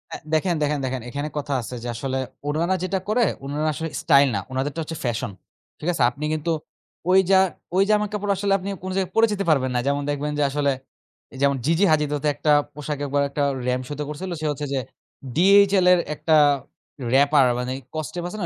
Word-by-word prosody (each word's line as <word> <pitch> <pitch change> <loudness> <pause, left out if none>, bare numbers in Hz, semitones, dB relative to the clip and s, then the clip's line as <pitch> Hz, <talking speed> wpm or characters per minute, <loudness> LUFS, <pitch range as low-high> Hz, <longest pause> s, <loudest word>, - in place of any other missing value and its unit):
আ - - -4 0.2
দেখেন, 170 +2 +2
দেখেন, 150 0 0
দেখেন। 130 -1 -3
এখানে 145 +4 -3
কথা 145 -1 -2
আছে 125 - -7
যে - - -4
আসলে 130 +2 -3 0.3
উনারা 170 +5 +1
যেটা 185 +1 -1
করে, 235 +2 +3 0.2
উনারা 150 +3 -2
আসলে 160 +4 -4
স্টাইল 140 0 +5
না। - - 0
উনাদেরটা 140 +4 -2
হচ্ছে 160 +1 -6
ফ্যাশন। 115 -3 -2 0.5
ঠিক 155 - -6
আছে? 135 - +1
আপনি 140 +5 -9
কিন্তু 155 +2 -1 0.6
ওই 190 +1 +6
জা 190 - +7 0.4
ওই 195 - +5
জামা 210 0 +3
কাপড় 205 -1 -1
আসলে 200 -1 +1
আপনি 195 +1 -6
কোনো 185 - -4
জায়গায় 190 -2 -1
পড়ে 225 0 +5
যেতে 200 -1 -2
পারবেন 130 -4 +2
না। - - +2
যেমন 140 0 +1
দেখবেন 145 +1 -2
যে 145 - +3
আসলে, 140 0 +1 0.7
যেমন 140 0 +3
Gigi 165 +6 +3
Hadid 150 -2 +2
হত 145 - -4
একটা 150 +1 +1 0.2
পোশাকে 150 0 -4
একবার 140 +1 +1
একটা 145 +1 -1 0.2
রাম্প 125 0 0
শোতে 145 0 -4
করছিল। 180 +5 -5
সে 155 - -3
হচ্ছে 145 0 -4
যে 135 - +1 0.6
DHL 195 +1 +5
এর 180 - +3 0.2
একটা 160 +1 +2 0.8
র‍্যাপার 140 0 +5
মানে 125 +1 -2 0.2
কস্টেপ 155 +3 -4
আছে 195 +4 -7
না? 175 - -1
150 Hz, 200 wpm, -23 LUFS, 140-185 Hz, 0.8 s, জা